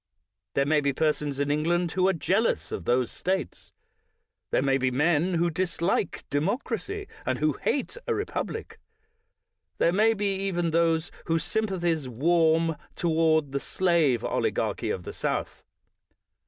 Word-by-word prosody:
There 140 - +3
may 150 +1 +3
be 140 -1 +1
persons 150 -2 0
in 145 0 +1
England 170 +3 +1
who 185 +1 +2
are 190 - +3
jealous 195 +6 0
of 85 - -5
those 125 -1 +1
States. 190 +1 -3 0.8
There - - +1
may 135 -1 +2
be 130 0 +2
men 160 +6 +2
who 170 +1 +2
dislike 175 +2 -1
democracy, 245 - -2 0.2
and - - -1
who - - +1
hate - - -2
a 460 - +1
republic; 420 +1 -4 1.0
there 170 - +3
may 220 +3 +4
be 200 -1 0
even 175 -4 -1
those 165 0 +2 0.2
whose 165 -1 +1
sympathies 175 -9 -1
warm 165 +4 +2 0.2
toward 160 -3 +2
the 140 - -1
slave 165 -9 +1
oligarchy - - -1
of 90 - -2
the - - -7
South. - - -3
165 Hz, 140 wpm, -27 LUFS, 145-185 Hz, 1.0 s, may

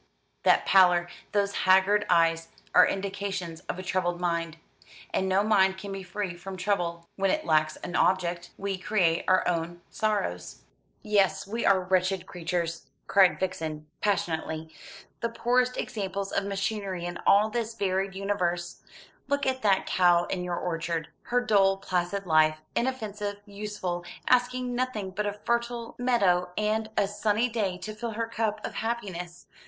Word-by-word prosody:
"That - - +4
pallor, 180 -2 +5 0.2
those 200 -1 +1
haggard 190 +3 +4
eyes 165 -1 +3 0.3
are - - +7
indications 195 -4 -3
of - - -2
a 185 - -6
troubled 180 -1 -1
mind; 170 -2 -1 0.6
and 190 - +1
no 190 +2 +3
mind 190 -3 +3
can 200 +1 -7
be 195 0 -5
free 185 0 -4
from 190 +2 -8
trouble 175 -3 -1
when 195 0 +2
it - - 0
lacks 155 -1 +2
an 175 - -6
object. 175 -2 +1
We 195 -1 -3
create 180 -4 +1
our 185 0 +3
own 175 0 -2
sorrows." 90 - -2 0.4
"Yes, 205 -3 +2
we 225 +4 -2
are 190 -1 +5
wretched 185 0 +1
creatures!" 170 -1 -3 0.2
cried 190 -2 +4
Vixen 160 -5 -3 0.2
passionately, 160 -5 -1 0.5
"the 230 - -1
poorest 250 +2 +1
examples 195 -2 -3
of 200 - 0
machinery 195 -2 -2
in 175 0 -5
all 210 +2 +5
this 230 -1 -2
varied 190 -2 -1
universe. 180 -3 -2 0.5
Look 285 0 0
at 260 0 0
that 195 -3 +3
cow 175 -1 +4
in 180 -1 -3
your 175 -1 -2
orchard, 165 -2 -2 0.2
her 245 +1 +1
dull 195 -5 +3
placid 185 +1 -2
life, 155 -2 +4 0.2
inoffensive, 215 -5 -2
useful, 200 -4 -4 0.2
asking 250 0 +2
nothing 240 -6 -2
but 210 +2 -2
a 205 - -1
fertile 235 0 -1
meadow 195 -8 +2
and 215 +1 0
a 200 - +3
sunny 210 +3 +1
day 205 -6 -1
to 215 +3 -6
fill 225 +1 -5
her 230 +2 -1
cup 225 -2 -2
of - - -5
happiness. 190 -7 -4
195 Hz, 155 wpm, -27 LUFS, 175-210 Hz, 0.6 s, are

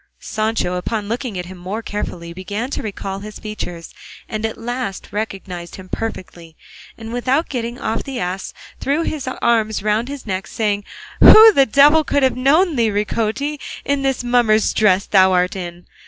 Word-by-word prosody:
Sancho 215 -4 -1
upon 210 +4 -2
this 205 - -9
looking 235 -3 -3
at 180 - -4
him 185 0 -10
more 200 +6 -5
carefully 170 -5 -5
began 205 +8 -5
to - - -3
recall 195 -2 -5
his 210 +1 -9
features, 180 -6 -7 0.3
and 215 +1 -2
at 220 - -8
last 240 -3 -4
recognised 190 -5 -5
him 185 -1 -11
perfectly, 175 -7 -6 0.4
and 225 0 -8
without 260 +6 0
getting 240 -2 -4
off 220 +1 -2
the 270 -3 -5
ass 185 -1 -3 0.3
threw 290 +4 0
his 295 -5 -4
arms 225 -5 0
round 215 +3 +1
his 280 -1 -7
neck 190 -2 -3
saying, 205 -2 -1 0.4
"Who 440 +1 +10
the 275 -4 +4
devil 295 +6 +5
could 285 -1 +1
have 260 - +3
known 300 +5 +3
thee, 230 -2 +3
Ricote, 220 +8 -1 0.3
in 280 0 0
this 270 -2 0
mummer's 240 -3 +3
dress 195 -3 +3
thou 190 -2 +4
art 180 +1 +1
in? 175 -1 -7
220 Hz, 175 wpm, -19 LUFS, 190-255 Hz, 0.4 s, Who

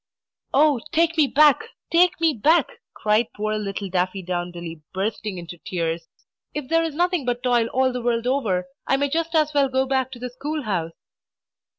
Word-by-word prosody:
"Oh, 290 -2 +4
take 335 0 +2
me 310 -3 +4
back! 295 +1 +5 0.3
take 345 0 +4
me 325 -2 +3
back!" 305 +7 +3 0.3
cried 215 +2 +2
poor 215 +1 -2
little 200 -1 -4
Daffydowndilly, 175 -3 -3
bursting 205 0 -2
into 175 0 -8
tears. 165 -2 -3 0.5
"If 295 -3 -4
there 330 0 +3
is 320 -3 -3
nothing 355 -1 +1
but 245 0 -2
Toil 240 -2 +3
all 260 +1 +1
the 250 - -3
world 235 -1 0
over, 225 -9 0 0.2
I 270 - +3
may 285 +1 0
just 330 +1 -1
as 305 -1 +3
well 280 -2 +3
go 260 +1 +1
back 260 -1 0
to - - -8
the 250 0 -5
school 290 +4 -4
house!" 175 -7 -2
250 Hz, 180 wpm, -23 LUFS, 195-300 Hz, 0.5 s, back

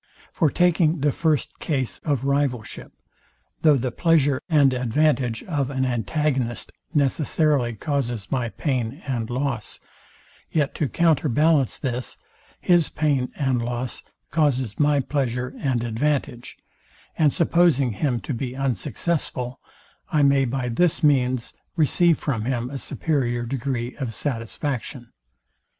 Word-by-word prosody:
For 155 - +2
takeing 170 -2 +2
the 145 0 +3
first 155 -2 0
case 135 -6 -2
of 140 -5 -1
rivalship; 140 -5 -1 0.7
though 150 -3 +5
the 130 0 -2
pleasure 145 -5 +2
and 145 -5 +4
advantage 125 -1 +1
of 145 -7 -1
an 130 -1 -1
antagonist 125 +1 -1 0.2
necessarily 145 -3 +1
causes 120 -4 -3
my 125 -3 0
pain 130 - -2
and 120 -4 -2
loss, 125 -3 -3 0.7
yet 150 -3 +1
to 150 - -1
counter 165 -3 +2
ballance 150 0 +3
this, 125 -2 -4 0.4
his 175 -3 +3
pain 140 -5 0
and 130 -4 0
loss 120 +1 -3 0.3
causes 130 -8 +1
my 145 -1 +3
pleasure 125 -2 -2
and 125 -4 0
advantage; 120 +1 -2 0.6
and 150 -3 +3
supposing 165 -6 +3
him 120 +3 -1
to 145 - -4
be 125 +1 -4
unsuccessful, 135 0 -2 0.5
I 150 -2 +3
may 140 -1 +4
by 125 0 -2
this 165 +9 +1
means 130 -4 +2 0.2
receive 165 +1 +3
from 115 -7 -2
him 125 0 -2
a 140 - -4
superior 120 -8 -1
degree 125 -1 -3
of 125 -6 -4
satisfaction. 125 0 -4
135 Hz, 125 wpm, -23 LUFS, 120-150 Hz, 0.7 s, though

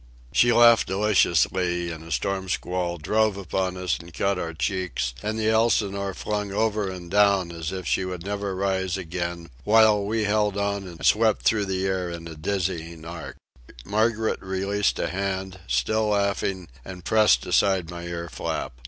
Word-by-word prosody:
She 120 +11 +4
laughed 115 -1 +6
deliciously, 90 -3 +2
and 80 -1 -8
a 80 - -11
snow 95 +1 -1
squall 90 -1 -2
drove 105 +5 +1
upon 95 0 -2
us 90 -3 -1
and 85 +2 -12
cut 100 +3 0
our 85 -2 -3
cheeks, 90 -8 -2
and 105 +1 -2
the 110 0 +1
Elsinore 100 -4 +1
flung 105 -1 -3
over 105 -1 0
and 90 -2 -8
down 100 -3 +3
as 85 0 -5
if 95 -1 -5
she - - +1
would 90 -1 -5
never 100 -1 -3
rise 95 -1 -1
again, 85 -2 -5
while 110 -1 +5
we 110 +2 -1
held 105 -1 +1
on 100 -1 -1
and 85 -5 -7
swept 110 0 +3
through 105 -3 +2
the 95 0 -2
air 95 -2 -1
in 85 -1 -7
a 80 - -8
dizzying 85 -1 -3
arc. 80 -4 -7 0.5
Margaret 110 +2 0
released 100 +2 -1
a - - -1
hand, 95 +1 -3
still 110 - +1
laughing, 100 -3 0 0.2
and 90 +2 -10
pressed 105 - +4
aside 95 -4 +2
my 85 0 -7
ear 85 -1 -5
flap. 75 - -4
95 Hz, 170 wpm, -25 LUFS, 85-105 Hz, 0.5 s, laughed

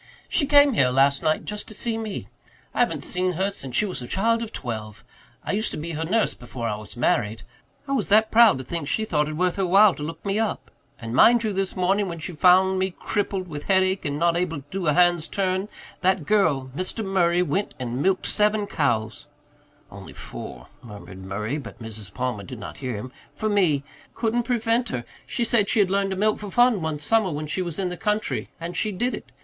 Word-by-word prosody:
"She 285 - +1
came 285 -1 +6
here 130 - +3
last 135 +2 +3
night 155 0 0
just 210 0 -5
to 215 - -8
see 230 +1 -1
me. 220 -3 -5 0.5
I - - -4
haven't 165 - +1
seen 180 0 -1
her 190 +4 0
since 135 -10 -7
she 210 - +3
was 185 -9 -3
a 125 - -7
child 230 - +1
of 225 -1 -5
twelve. 110 -3 -6 0.4
I - - -1
used 215 +2 0
to - - -5
be 165 +2 -4
her 160 0 -3
nurse 215 +7 +1
before 120 -1 -6
I 105 - -1
was 105 +2 -10
married. 110 -2 0 0.4
I - - -4
was 260 -7 0
that 215 +2 +4
proud 230 - +6
to 130 - -6
think 160 +2 -4
she 220 - 0
thought 150 -7 +1
it 155 - -5
worth 180 +1 +1
her 195 - +1
while 195 +2 +6
to - - -10
look 160 +6 -6
me 200 +2 0
up. 225 -1 -2 0.3
And, 115 -1 -6
mind 235 - +6
you, 215 -2 -1
this 195 0 -1
morning, 195 +2 +1
when 170 -2 -5
she 165 +3 -6
found 185 +3 +4
me 190 -1 -1
crippled 195 -3 -2
with 150 -3 -7
headache 190 0 +2
and 145 -3 -2
not 170 +2 +2
able 170 -4 -1
to 145 - -35
do 190 -3 -3
a 150 - +4
hand's 175 -1 +3
turn, 190 +1 -1 0.3
that 185 -4 +1
girl, 145 -11 +2
Mr. 185 +6 -3
Murray, 180 -2 +2
went 185 +5 -2
and 125 +1 -3
milked 190 +3 +1
seven 210 0 +2
cows" 115 - -1 0.6
"only - - -10
four," - - -9
murmured 100 -4 -11
Murray, 105 +9 -3
but 135 - -10
Mrs. 110 -4 -8
Palmer 125 -2 -3
did 125 +4 -8
not 100 - -8
hear 125 -4 -3
him 125 +5 -6 0.2
"for 215 - -1
me. 175 -9 +2 0.3
Couldn't 235 +1 0
prevent 235 -1 +1
her. 120 - -4 0.2
She 240 - -1
said 225 -3 +2
she - - +2
had 195 -2 +3
learned 195 0 +1
to 190 - -2
milk 215 +2 +1
for 210 - -6
fun 240 -2 +3
one 160 -1 -2
summer 195 +7 +2
when 150 -1 -4
she 155 +5 -2
was 170 -4 -4
in 190 -2 -1
the 180 - -6
country, 210 +1 -1
and 170 +1 -5
she 215 - 0
did 240 +6 -1
it. - - -8
180 Hz, 230 wpm, -24 LUFS, 140-210 Hz, 0.6 s, came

